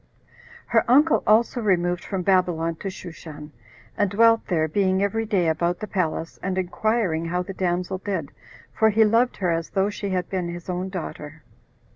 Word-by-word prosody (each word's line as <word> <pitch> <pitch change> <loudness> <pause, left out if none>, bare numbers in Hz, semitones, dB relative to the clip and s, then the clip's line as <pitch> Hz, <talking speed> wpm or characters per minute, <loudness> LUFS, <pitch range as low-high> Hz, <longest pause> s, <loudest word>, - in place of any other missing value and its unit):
Her - - +2
uncle 295 +6 +5
also 230 +3 +3
removed 180 -4 +1
from 190 -2 -3
Babylon 175 -3 +1
to 195 - -6
Shushan, 160 -4 -10 0.4
and 205 - +1
dwelt 225 +3 +4
there, 160 -4 +1
being 190 +3 +1
every 225 +2 -1
day 190 -6 +1
about 170 +2 0
the - - -5
palace, 165 -5 -3
and 190 -1 -2
inquiring 185 -2 0
how 180 +2 -1
the 195 - -7
damsel 180 0 -2
did, 185 -7 -4 0.4
for 220 - +3
he 220 +1 +4
loved 230 +4 +2
her 180 -3 0
as 165 0 -2
though 195 +1 0
she 205 -1 -5
had 180 -2 -1
been 180 -3 -3
his 175 +1 -6
own 180 +1 -3
daughter. 155 -4 -7
185 Hz, 175 wpm, -24 LUFS, 170-205 Hz, 0.4 s, uncle